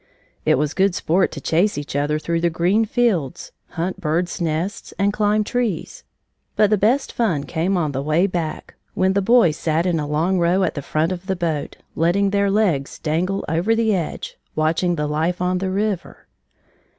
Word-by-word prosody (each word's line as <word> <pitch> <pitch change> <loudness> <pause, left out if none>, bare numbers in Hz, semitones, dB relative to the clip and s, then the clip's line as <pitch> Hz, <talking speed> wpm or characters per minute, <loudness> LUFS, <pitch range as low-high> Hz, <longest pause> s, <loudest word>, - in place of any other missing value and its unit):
It - - +5
was 150 +2 0
good 195 -1 +2
sport 180 +4 +1
to - - -6
chase 180 +4 +1
each 145 -1 -5
other 145 +1 +1
through 165 +2 -2
the 170 - +2
green 180 +7 +2
fields, 200 - 0 0.3
hunt 185 +3 -2
birds' 175 +3 -1
nests, 170 +5 -3
and 200 +1 +1
climb 210 0 +2
trees, 230 -4 -3 0.5
but 210 -1 +3
the - - +6
best 245 +8 +1
fun 180 -12 0
came 175 +5 -1
on 155 -4 0
the 135 0 -3
way 155 +5 +2
back, 170 -5 -4 0.2
when 190 +1 +2
the 200 - +2
boys 195 -7 +4
sat 160 +1 0
in 175 -3 +1
a 150 - -3
long 165 +5 +1
row 175 +3 +2
at - - 0
the 145 - -4
front 155 +4 0
of 185 +1 -6
the 190 - 0
boat, 165 -5 -3 0.2
letting 195 +5 +2
their 200 0 +2
legs 190 -10 +1
dangle 175 +5 -1
over 175 +8 +1
the 225 -1 +2
edge, 175 -5 -4 0.2
watching 165 +3 +1
the 150 -2 -1
life 160 +4 -1
on 180 0 0
the 190 0 -2
river. 195 -1 -3
175 Hz, 190 wpm, -21 LUFS, 160-200 Hz, 0.5 s, the